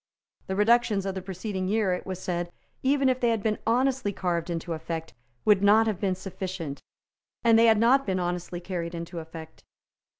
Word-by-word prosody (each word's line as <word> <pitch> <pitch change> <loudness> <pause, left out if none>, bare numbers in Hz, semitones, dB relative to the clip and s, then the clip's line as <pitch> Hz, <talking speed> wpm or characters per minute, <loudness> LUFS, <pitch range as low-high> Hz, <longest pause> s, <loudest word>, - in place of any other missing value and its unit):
The 190 - -2
reductions 210 -1 +3
of 195 - -2
the 190 - -4
preceding 190 +1 -4
year, 205 -2 +1
it 180 - -5
was 185 -1 -3
said, 175 -1 -3 0.3
even 275 0 +2
if 255 -1 +2
they 240 - +2
had 225 -3 0
been 215 -1 0
honestly 255 -1 +2
carved 175 -3 -2
into 170 0 -3
effect, 160 0 -5 0.3
would 210 -3 +5
not 210 +2 +6
have 215 -4 -1
been 190 -3 0
sufficient; 185 -6 -6 0.6
and 230 -1 +5
they 230 - +6
had 220 -1 +6
not 250 +4 +4
been 185 -1 0
honestly 175 0 -3
carried 175 -1 -4
into 170 +1 -6
effect. 160 0 -10
190 Hz, 190 wpm, -27 LUFS, 175-225 Hz, 0.6 s, not